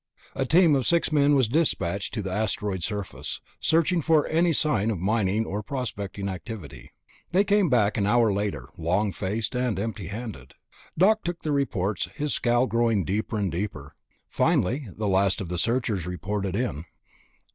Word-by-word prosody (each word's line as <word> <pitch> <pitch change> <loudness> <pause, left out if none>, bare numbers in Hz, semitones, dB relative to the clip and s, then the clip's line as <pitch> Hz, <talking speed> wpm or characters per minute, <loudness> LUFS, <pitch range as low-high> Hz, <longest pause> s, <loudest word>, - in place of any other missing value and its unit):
A 135 -1 -2
team 170 0 +5
of 135 -3 +1
six 170 -1 +2
men 145 -1 +4
was 130 -4 +3
dispatched 100 - 0
to 105 - -2
the 95 - -4
asteroid 105 -2 -1
surface, 100 0 -4 0.2
searching 165 +2 +2
for 155 -1 +3
any 170 +2 +2
sign 125 -9 +2
of 110 - -1
mining 105 +3 +1
or 105 +1 -3
prospecting 100 -5 -4
activity. 90 - -7 0.4
They 190 +3 +5
came 205 -3 +3
back 110 -5 +2
an 100 -2 +1
hour 115 -1 +3
later, 100 -11 -3
long 95 +6 +1
faced 105 +4 -3
and 125 -3 0
empty 105 -2 -4
handed. 100 - -7 0.4
Doc 215 +5 +4
took 170 0 -4
their 150 - 0
reports, 100 -10 -1
his 145 +3 -1
scowl 120 +1 +2
growing 115 -5 +1
deeper 110 +4 -2
and 100 -4 -1
deeper. 85 -5 -5 0.3
Finally 130 +8 +1
the 105 -1 -1
last 95 0 +2
of 95 -5 -5
the 90 -1 -2
searchers 115 -6 0
reported 95 +2 -3
in. 100 -9 -2
110 Hz, 170 wpm, -26 LUFS, 95-135 Hz, 0.4 s, team